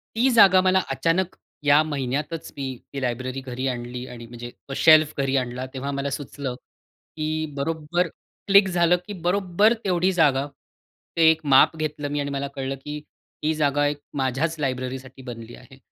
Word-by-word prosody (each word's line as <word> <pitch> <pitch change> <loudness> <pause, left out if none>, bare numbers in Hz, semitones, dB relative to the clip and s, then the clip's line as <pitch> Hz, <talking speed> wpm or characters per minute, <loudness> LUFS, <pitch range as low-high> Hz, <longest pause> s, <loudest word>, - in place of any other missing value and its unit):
ती 245 +4 +3
जागा 195 -6 +7
मला 185 0 +3
अचानक 165 +7 0 0.3
या 145 +1 +6
महिन्यातच 145 +2 -3
मी 140 - -3 0.3
ती 140 - -4
लायब्ररी 130 +1 -3
घरी 130 0 -4
आणली. 125 0 -4
आणि 120 -2 -9
म्हणजे 120 0 -9 0.2
तो - - -4
शेल्फ 155 0 +6
घरी 135 -1 0
आणला 125 0 -3
तेव्हा 135 +1 -4
मला 140 0 -2
सुचलं, 140 -2 -5
की 155 +4 -6
बरोबर 160 +4 -1 0.4
क्लिक 200 0 +6
झालं, 175 -1 +3
की 205 - -5
बरोबर 190 +3 +2
तेवढी 185 -1 +2
जागा, 145 -5 +3 0.7
ते 165 -1 +6
एक 160 - -2
माप 135 - +6
घेतलं 150 -1 -3
मी 145 - -1
आणि 140 0 -2
मला 140 0 -2
कळलं, 135 0 -3
की 150 0 -5 0.4
ही 155 - +2
जागा 145 -1 +1
एक 145 0 -3 0.2
माझ्याच 135 +5 0
लायब्ररीसाठी 130 0 -4
बनली 120 -2 -9
आहे. 135 -1 -16
145 Hz, 165 wpm, -24 LUFS, 130-165 Hz, 0.7 s, जागा